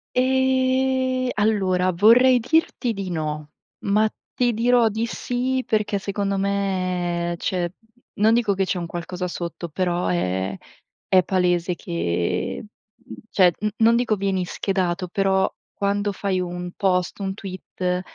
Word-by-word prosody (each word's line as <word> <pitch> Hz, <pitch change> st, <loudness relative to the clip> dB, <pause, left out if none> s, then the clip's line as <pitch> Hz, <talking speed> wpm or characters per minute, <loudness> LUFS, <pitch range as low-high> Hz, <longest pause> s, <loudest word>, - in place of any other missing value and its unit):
Ehm, 260 Hz, 0 st, +2 dB
allora 190 Hz, -4 st, +2 dB
vorrei 240 Hz, +7 st, +6 dB
dirti 255 Hz, -2 st, +1 dB
di 195 Hz, -3 st, -5 dB
no, 150 Hz, -2 st, -4 dB, 0.3 s
ma 210 Hz, +2 st, +3 dB, 0.3 s
ti 245 Hz, -1 st, +2 dB
dirò 235 Hz, +1 st, +3 dB
di 220 Hz, +2 st, -2 dB
sì, 255 Hz, +2 st, -2 dB
perché 215 Hz, -2 st, 0 dB
secondo 200 Hz, 0 st, -2 dB
me 185 Hz, -3 st, -1 dB
c'è 175 Hz, -1 st, -1 dB, 0.4 s
non 220 Hz, +2 st, +4 dB
dico 225 Hz, -4 st, +2 dB
che 195 Hz, -, +1 dB
c'è 185 Hz, -1 st, -2 dB
un 170 Hz, -, -4 dB
qualcosa 180 Hz, +2 st, -4 dB
sotto, 170 Hz, 0 st, -5 dB
però 175 Hz, +2 st, -1 dB
è 95 Hz, -, -1 dB, 0.5 s
è 185 Hz, -1 st, +5 dB
palese 180 Hz, -1 st, +1 dB
che, 90 Hz, -, -2 dB
mhmm, 215 Hz, +2 st, -16 dB, 0.2 s
cioè 180 Hz, -3 st, +5 dB
n 210 Hz, -, +1 dB
non 230 Hz, +1 st, +5 dB
dico 230 Hz, -3 st, +1 dB
vieni 190 Hz, -2 st, 0 dB
schedato. 185 Hz, -1 st, -1 dB
Però 190 Hz, 0 st, +2 dB, 0.2 s
quando 205 Hz, +1 st, 0 dB
fai 190 Hz, -1 st, -1 dB
un 175 Hz, 0 st, -5 dB
post, 180 Hz, -1 st, 0 dB
un 190 Hz, -1 st, -2 dB
tweet, 185 Hz, -2 st, -4 dB
195 Hz, 135 wpm, -23 LUFS, 180-225 Hz, 0.5 s, vorrei